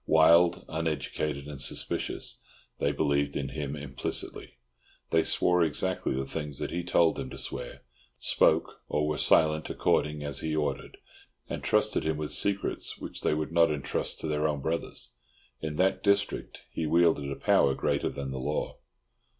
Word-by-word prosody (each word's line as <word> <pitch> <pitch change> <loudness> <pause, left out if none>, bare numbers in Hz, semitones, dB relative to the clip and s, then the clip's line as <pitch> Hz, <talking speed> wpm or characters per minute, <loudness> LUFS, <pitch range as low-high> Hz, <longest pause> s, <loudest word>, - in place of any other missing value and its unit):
Wild, 85 +2 +5
uneducated, 75 -3 -2
and 70 -2 -7
suspicious, 70 - -2 0.4
they 70 - +2
believed 70 -1 0
in 70 -2 -2
him 75 -1 -4
implicitly. 70 -3 -3 0.6
They 80 - +5
swore 90 +2 +3
exactly 85 -1 0
the 65 +1 -2
things 75 0 -4
that - - -3
he 85 +1 -2
told 85 -1 +3
them - - -4
to - - -8
swear, - - -5 0.3
spoke - - +2
or 75 0 +1
were 75 -1 -1
silent 80 0 +3
according 75 0 +1
as 70 -2 -2
he 80 -1 -2
ordered, 75 -1 -2 0.5
and - - -4
trusted - - +2
him 80 -1 0
with 75 -1 -4
secrets 100 0 -1
which - - -7
they - - +1
would 75 +1 -3
not 85 0 +5
entrust 75 -3 -2
to - - -3
their 75 0 +1
own 75 -2 -1
brothers. 80 +4 -3 0.5
In 80 -1 -3
that 95 +4 +2
district 100 0 0
he 80 - -2
wielded 80 -3 +3
a 70 - -3
power 70 0 +3
greater - - 0
than 70 -1 -5
the 65 - -4
law. 75 +4 -2
75 Hz, 165 wpm, -29 LUFS, 70-80 Hz, 0.6 s, Wild